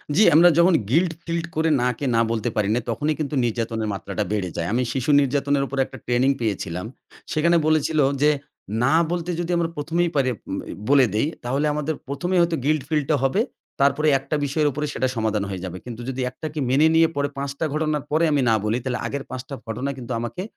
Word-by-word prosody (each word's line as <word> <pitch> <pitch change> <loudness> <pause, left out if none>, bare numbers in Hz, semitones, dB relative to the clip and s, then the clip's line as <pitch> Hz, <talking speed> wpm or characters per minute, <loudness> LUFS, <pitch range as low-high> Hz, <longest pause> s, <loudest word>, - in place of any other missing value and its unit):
জ্বি, 215 - +6
আমরা 175 +2 +8
যখন 175 +1 +5 0.2
গিল্ট 165 +4 +2
ফিল্ট 170 -1 -2
করে 160 +1 +2
না 125 - +2
কে 140 - -2
না 115 - +4
বলতে 115 +1 -1
পারি 105 -1 +1
না। - - +2
তখনই 150 +7 0
কিন্তু 150 -1 -2
নির্যাতনের 115 -1 -2
মাত্রাটা 100 +2 -3
বেড়ে 100 -4 -1
যায়। 85 0 -1
আমি 125 - +2
শিশু 135 +2 -2
নির্যাতনের 140 +1 +1
উপর 140 - -6
একটা - - -11
ট্রেনিং 125 +2 +2
পেয়েছিলাম। 95 -4 -2 0.5
সেখানে 170 +2 +3
বলেছিল 155 0 +2 0.2
যে, 150 - +5 0.5
"না 135 - +3 0.2
বলতে 175 0 -2
যদি 175 +1 -2
আমরা 165 -1 0
১ম 160 +3 -4
এই 170 - -2
পারি 135 -2 +2
উ - - -11 0.5
বলে 140 -3 +6
দেই, 125 +7 +2 0.2
তাহলে 135 +5 0
আমাদের 150 +1 -2
১ম 140 +6 -3
এই - - +5
হয়তো 170 -1 +1
গিল্ট 155 -3 +2
ফিল্ট 150 -3 +1
টা - - +4
হবে। 135 +11 +2 0.4
তারপরে 140 +3 +3
একটা 140 +3 -3
বিষয়ের 150 +2 +1
উপরে 150 +3 -3
সেটা 130 - 0
সমাধান 110 -2 0
হয়ে 95 -2 -5
যাবে। 90 0 -6
কিন্তু 120 -1 -7
যদি 130 0 -3
একটাকে 155 +2 -6
মেনে 145 +5 +5
নিয়ে, 165 0 +6 0.3
৫ 140 0 -3
টা 160 - +1
ঘটনার 155 -2 -1
পরে 160 +2 +2
আমি 145 -2 +2
না 110 - +4
বলি 110 +3 +1
তাহলে 125 -1 -2
আগের 140 -1 -4
৫ 130 0 -5
টা 140 - -4
ঘটনা 125 +5 -3
কিন্তু 125 -1 -7
আমাকে, 120 +9 -4
140 Hz, 215 wpm, -23 LUFS, 120-155 Hz, 0.5 s, আমরা